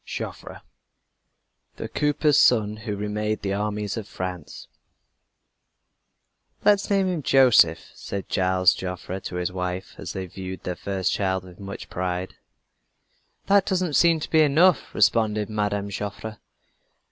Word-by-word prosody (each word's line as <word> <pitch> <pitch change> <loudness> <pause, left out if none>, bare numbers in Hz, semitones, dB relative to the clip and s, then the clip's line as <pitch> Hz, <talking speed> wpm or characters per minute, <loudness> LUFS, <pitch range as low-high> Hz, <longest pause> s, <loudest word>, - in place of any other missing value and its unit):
JOFFRE - - -7 1.1
THE - - -6
COOPER'S 150 0 +2
SON 110 -6 +3
WHO 105 -1 -4
REMADE 105 +1 -2
THE 100 -1 -1
ARMIES 105 +1 -2
OF 110 -2 -5
FRANCE 90 -4 -7 2.0
"Let's 205 -1 +4
name 195 -1 +2
him 180 -4 -1
Joseph," 125 - +4
said 100 -1 -6
Gilles 95 -1 +3
Joffre 90 0 -5
to 90 - -6
his 90 +1 -2
wife, 90 0 -4
as - - -6
they 95 -1 -4
viewed 95 +1 -8
their 90 - -3
first 95 -1 -2
child 95 -2 -1
with 90 -1 -14
much 100 0 -8
pride. 90 0 -3 1.1
"That 200 -1 +3
doesn't 185 -4 0
seem 165 +1 +4
to - - -6
be 160 - +5
enough," 160 +4 +3
responded 110 -2 +2
Mme. 105 -1 -1
Joffre. 105 +2 -6
105 Hz, 135 wpm, -24 LUFS, 95-135 Hz, 2.0 s, be